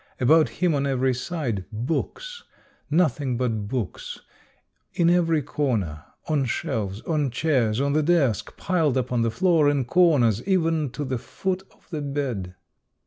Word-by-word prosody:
About 155 Hz, +5 st, +5 dB
him 180 Hz, -3 st, 0 dB
on 140 Hz, -1 st, 0 dB
every 130 Hz, -1 st, +1 dB
side, 125 Hz, -, -3 dB
books, 305 Hz, -, -3 dB, 0.2 s
— -, -, -35 dB
noth 155 Hz, -5 st, +2 dB
ing 130 Hz, -4 st, -1 dB
but 115 Hz, -5 st, -1 dB
books; 115 Hz, -4 st, -4 dB, 0.7 s
in 170 Hz, -1 st, +3 dB
every 165 Hz, -4 st, +2 dB
corner, 105 Hz, -, -2 dB, 0.2 s
on 150 Hz, -4 st, +1 dB
shelves, 115 Hz, -, -3 dB
on 150 Hz, -4 st, 0 dB
chairs, 120 Hz, -5 st, +1 dB
on 140 Hz, +1 st, +1 dB
the 155 Hz, -, +3 dB
desk, 145 Hz, -, +1 dB
piled 160 Hz, -8 st, +1 dB
upon 125 Hz, -2 st, 0 dB
the 115 Hz, -, +2 dB
floor, 155 Hz, +4 st, +3 dB
in 140 Hz, -3 st, 0 dB
corners, 130 Hz, -, +3 dB
even 165 Hz, -6 st, +1 dB
to 145 Hz, +4 st, -5 dB
the 130 Hz, -2 st, -2 dB
foot 190 Hz, +8 st, -3 dB
of -, -, -28 dB
the 155 Hz, -3 st, -3 dB
bed. 130 Hz, -11 st, -3 dB
140 Hz, 155 wpm, -24 LUFS, 120-160 Hz, 0.7 s, About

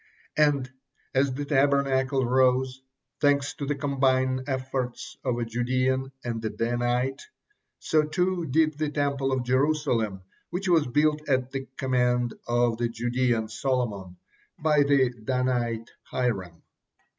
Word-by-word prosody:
And 145 Hz, -4 st, +3 dB, 0.5 s
as 135 Hz, 0 st, +2 dB
the 145 Hz, +1 st, -3 dB
Tabernacle 135 Hz, -2 st, +2 dB
rose, 130 Hz, +1 st, +2 dB, 0.4 s
thanks 145 Hz, -1 st, +2 dB
to 140 Hz, -, -4 dB
the 145 Hz, -, 0 dB
combined 130 Hz, -2 st, +1 dB
efforts 130 Hz, -2 st, -3 dB
of 125 Hz, -3 st, 0 dB
a 120 Hz, -, -1 dB
Judean 130 Hz, +3 st, 0 dB
and 115 Hz, -2 st, -3 dB
a 110 Hz, -, 0 dB
Danite, 120 Hz, +3 st, -1 dB, 0.6 s
so 155 Hz, -, +2 dB
too 175 Hz, +2 st, -1 dB
did 155 Hz, +2 st, +2 dB
the 155 Hz, -1 st, 0 dB
Temple 140 Hz, -2 st, 0 dB
of 130 Hz, -1 st, 0 dB
Jerusalem, 125 Hz, -7 st, +1 dB, 0.3 s
which 185 Hz, +3 st, -3 dB
was 165 Hz, -5 st, +4 dB
built 150 Hz, +3 st, +1 dB
at 130 Hz, -1 st, +1 dB
the 135 Hz, -1 st, -4 dB
command 125 Hz, -2 st, +1 dB
of 120 Hz, -1 st, +1 dB
the 120 Hz, -1 st, 0 dB
Judean 120 Hz, -1 st, 0 dB
Solomon 110 Hz, -6 st, -2 dB, 0.4 s
by 150 Hz, -1 st, +3 dB
the 140 Hz, -3 st, +3 dB
Danite 120 Hz, -2 st, -1 dB
Hiram. 95 Hz, -9 st, -2 dB
130 Hz, 130 wpm, -26 LUFS, 120-140 Hz, 0.6 s, was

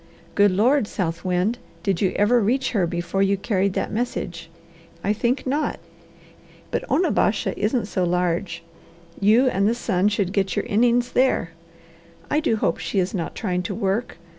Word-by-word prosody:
Good 205 Hz, 0 st, +5 dB
Lord, 225 Hz, +6 st, +2 dB
South 170 Hz, -4 st, -3 dB
Wind, 185 Hz, +6 st, 0 dB, 0.2 s
did 195 Hz, -4 st, 0 dB
you 190 Hz, -2 st, +2 dB
ever 235 Hz, +4 st, +3 dB
reach 255 Hz, +6 st, +1 dB
her 195 Hz, -7 st, +1 dB
before 175 Hz, +3 st, -2 dB
you 195 Hz, 0 st, +2 dB
carried 195 Hz, -1 st, 0 dB
that -, -, -2 dB
message? 175 Hz, -7 st, -3 dB, 0.5 s
I 205 Hz, -, +2 dB
think 240 Hz, +5 st, -1 dB
not! 285 Hz, +4 st, -1 dB, 0.9 s
But -, -, -1 dB
Onabasha 315 Hz, -, +1 dB
isn't 215 Hz, +2 st, 0 dB
so 190 Hz, -2 st, -1 dB
large. 175 Hz, 0 st, -1 dB, 0.6 s
You 220 Hz, +6 st, +4 dB
and 200 Hz, -5 st, +2 dB
the 235 Hz, -, 0 dB
sun 195 Hz, -5 st, +1 dB
should 200 Hz, -3 st, -1 dB
get 195 Hz, -3 st, 0 dB
your -, -, -1 dB
innings 240 Hz, +3 st, +2 dB
there. 255 Hz, -10 st, +2 dB, 0.8 s
I 300 Hz, -, +3 dB
do 310 Hz, -8 st, +1 dB
hope 170 Hz, -6 st, 0 dB
she -, -, -3 dB
is 185 Hz, 0 st, +1 dB
not 170 Hz, -4 st, -3 dB
trying 180 Hz, -4 st, -1 dB
to 175 Hz, -, -4 dB
work! 205 Hz, +1 st, -2 dB
200 Hz, 165 wpm, -23 LUFS, 185-235 Hz, 0.9 s, Good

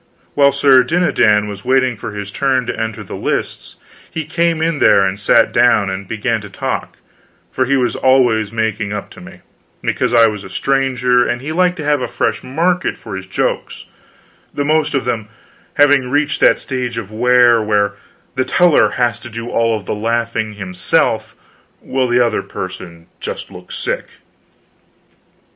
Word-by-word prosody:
While 140 Hz, -1 st, +4 dB
Sir 140 Hz, -1 st, +5 dB
Dinadan 120 Hz, -9 st, +2 dB
was 100 Hz, -1 st, -8 dB
waiting 130 Hz, -1 st, +2 dB
for 105 Hz, 0 st, -7 dB
his 100 Hz, -1 st, -6 dB
turn 130 Hz, +1 st, 0 dB
to -, -, -3 dB
enter 110 Hz, -2 st, -4 dB
the -, -, -8 dB
lists, -, -, -4 dB, 0.3 s
he 160 Hz, -1 st, -5 dB
came 170 Hz, +1 st, 0 dB
in 160 Hz, -1 st, 0 dB
there 100 Hz, -1 st, +5 dB
and 95 Hz, +1 st, -2 dB
sat 115 Hz, +2 st, +3 dB
down 115 Hz, -5 st, +3 dB
and 95 Hz, 0 st, -6 dB
began 115 Hz, +1 st, -2 dB
to 105 Hz, -, -10 dB
talk; -, -, -4 dB, 0.5 s
for 130 Hz, -, 0 dB
he 140 Hz, +2 st, +2 dB
was 125 Hz, -2 st, 0 dB
always 120 Hz, -6 st, +2 dB
making 110 Hz, -2 st, -2 dB
up 105 Hz, -, -6 dB
to -, -, -13 dB
me, -, -, -13 dB, 0.4 s
because -, -, 0 dB
I 115 Hz, -, +6 dB
was 105 Hz, -2 st, -2 dB
a 95 Hz, -, -10 dB
stranger 125 Hz, +1 st, +1 dB
and 120 Hz, +1 st, -1 dB
he 140 Hz, +5 st, -6 dB
liked 180 Hz, +2 st, +1 dB
to 155 Hz, -, -5 dB
have 145 Hz, -2 st, +1 dB
a -, -, -2 dB
fresh -, -, -1 dB
market 170 Hz, +6 st, -1 dB
for -, -, -8 dB
his 95 Hz, 0 st, -7 dB
jokes, 95 Hz, -, -3 dB, 0.7 s
the 145 Hz, -, -3 dB
most 155 Hz, -1 st, +1 dB
of 135 Hz, -, -1 dB
them 110 Hz, -4 st, -3 dB, 0.5 s
having 145 Hz, -3 st, +4 dB
reached 145 Hz, +2 st, 0 dB
that -, -, +5 dB
stage 125 Hz, -3 st, -4 dB
of 110 Hz, -3 st, -6 dB
wear 120 Hz, +1 st, +4 dB
where 105 Hz, -1 st, +1 dB, 0.4 s
the 130 Hz, -, 0 dB
teller 175 Hz, +3 st, +3 dB
has 120 Hz, -1 st, +1 dB
to 120 Hz, -, -10 dB
do 115 Hz, +1 st, -6 dB, 0.3 s
the -, -, -3 dB
laughing 110 Hz, 0 st, -2 dB
himself 95 Hz, -3 st, -1 dB, 0.4 s
while 130 Hz, -1 st, -1 dB
the 120 Hz, 0 st, +2 dB
other 115 Hz, -, -1 dB
person 85 Hz, -2 st, -8 dB, 0.5 s
looks -, -, -10 dB
sick. -, -, -3 dB
120 Hz, 170 wpm, -17 LUFS, 105-135 Hz, 0.7 s, I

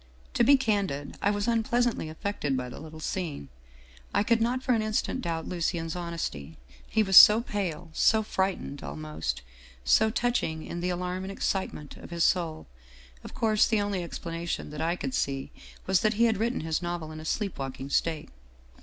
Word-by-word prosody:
" 65 Hz, -, -27 dB
To -, -, +3 dB
be 275 Hz, +4 st, +7 dB
candid, 200 Hz, -, -1 dB
I 200 Hz, -, +3 dB
was 205 Hz, +1 st, -1 dB
unpleasantly 235 Hz, -5 st, +1 dB
affected 155 Hz, -5 st, -2 dB
by 125 Hz, -1 st, -3 dB
the 125 Hz, -, -9 dB
little 160 Hz, 0 st, -10 dB
scene. 155 Hz, -, -4 dB, 0.7 s
I -, -, +4 dB
could 230 Hz, +1 st, +2 dB
not 250 Hz, +3 st, 0 dB
for 255 Hz, -, +2 dB
an 225 Hz, -, +2 dB
instant 215 Hz, +4 st, -1 dB
doubt 165 Hz, -6 st, -3 dB
Lucien's 165 Hz, -2 st, -2 dB
hon 170 Hz, -1 st, -4 dB
esty, 75 Hz, -, -5 dB, 0.3 s
he 220 Hz, -, +3 dB
was 195 Hz, -2 st, +1 dB
so 210 Hz, +4 st, +11 dB
pale, 185 Hz, -7 st, -4 dB
so 220 Hz, +5 st, +4 dB
frightened 190 Hz, -8 st, -2 dB
almost 75 Hz, -3 st, -4 dB, 0.4 s
so 220 Hz, 0 st, +4 dB
touching 220 Hz, -9 st, -1 dB
in 170 Hz, -, -5 dB
the 180 Hz, -, 0 dB
alarm 180 Hz, +1 st, -2 dB
and 190 Hz, +1 st, -5 dB
excitement 190 Hz, -6 st, -3 dB
of -, -, -11 dB
his 170 Hz, -1 st, 0 dB
soul. 165 Hz, -, +1 dB, 0.6 s
Of -, -, -10 dB
course 215 Hz, -2 st, +3 dB
the 220 Hz, -2 st, +2 dB
only 205 Hz, -2 st, -1 dB
explanation 170 Hz, -2 st, -4 dB
that 150 Hz, +1 st, -5 dB
I 165 Hz, +2 st, +1 dB
could 255 Hz, -, -4 dB
see 135 Hz, -, -2 dB, 0.3 s
was 190 Hz, -1 st, +3 dB
that 215 Hz, 0 st, +2 dB
he 230 Hz, -, +3 dB
had 225 Hz, -3 st, +3 dB
written 235 Hz, +4 st, 0 dB
his 160 Hz, +1 st, -1 dB
novel 175 Hz, -2 st, -4 dB
in 155 Hz, -, -8 dB
a -, -, -8 dB
sleep 200 Hz, +1 st, -2 dB
walking 135 Hz, 0 st, -5 dB
state. 160 Hz, 0 st, 0 dB
180 Hz, 190 wpm, -28 LUFS, 155-215 Hz, 0.7 s, so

